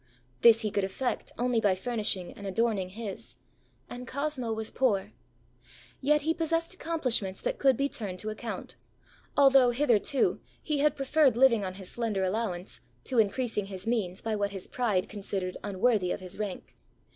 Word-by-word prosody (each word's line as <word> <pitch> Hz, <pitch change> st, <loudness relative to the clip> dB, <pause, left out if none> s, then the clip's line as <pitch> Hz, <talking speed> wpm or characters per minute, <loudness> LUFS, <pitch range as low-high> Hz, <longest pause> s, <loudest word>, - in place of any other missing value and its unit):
This 230 Hz, -1 st, +7 dB
he 215 Hz, -, -1 dB
could 200 Hz, -, 0 dB
effect 195 Hz, +7 st, -2 dB
only 245 Hz, -2 st, +1 dB
by 200 Hz, -4 st, +3 dB
furnishing 200 Hz, -3 st, -1 dB
and 200 Hz, -, -8 dB
adorning 195 Hz, -2 st, 0 dB
his. 190 Hz, -, -6 dB, 0.5 s
And 250 Hz, +1 st, -8 dB
Cosmo 280 Hz, -4 st, -2 dB
was 220 Hz, 0 st, -2 dB
poor. 200 Hz, -, +1 dB, 0.9 s
Yet 300 Hz, +2 st, +3 dB
he 320 Hz, +2 st, +2 dB
possessed 330 Hz, +1 st, -1 dB
accomplishments 255 Hz, -, -1 dB
that -, -, -2 dB
could 270 Hz, -3 st, +4 dB
be 275 Hz, -, +1 dB
turned 200 Hz, -9 st, -3 dB
to 215 Hz, +3 st, -3 dB
account; 225 Hz, +1 st, -6 dB, 0.6 s
although, 270 Hz, -3 st, +7 dB
hitherto, 245 Hz, 0 st, +2 dB, 0.2 s
he 300 Hz, -2 st, -1 dB
had 295 Hz, 0 st, +3 dB
preferred 275 Hz, -2 st, +3 dB
living 240 Hz, -5 st, +5 dB
on 185 Hz, -1 st, -4 dB
his 190 Hz, -1 st, -8 dB
slender 220 Hz, -5 st, -1 dB
allowance, 185 Hz, -2 st, -2 dB, 0.2 s
to 250 Hz, -, 0 dB
increasing 220 Hz, -1 st, +1 dB
his 190 Hz, -1 st, -7 dB
means 210 Hz, -5 st, -1 dB
by 225 Hz, -1 st, -1 dB
what 205 Hz, -1 st, 0 dB
his 195 Hz, -2 st, -5 dB
pride 215 Hz, -7 st, 0 dB
considered 195 Hz, -3 st, -4 dB
unworthy 200 Hz, -1 st, +1 dB
of -, -, -2 dB
his 185 Hz, +1 st, -7 dB
rank. 205 Hz, -3 st, -5 dB
225 Hz, 165 wpm, -29 LUFS, 195-260 Hz, 0.9 s, This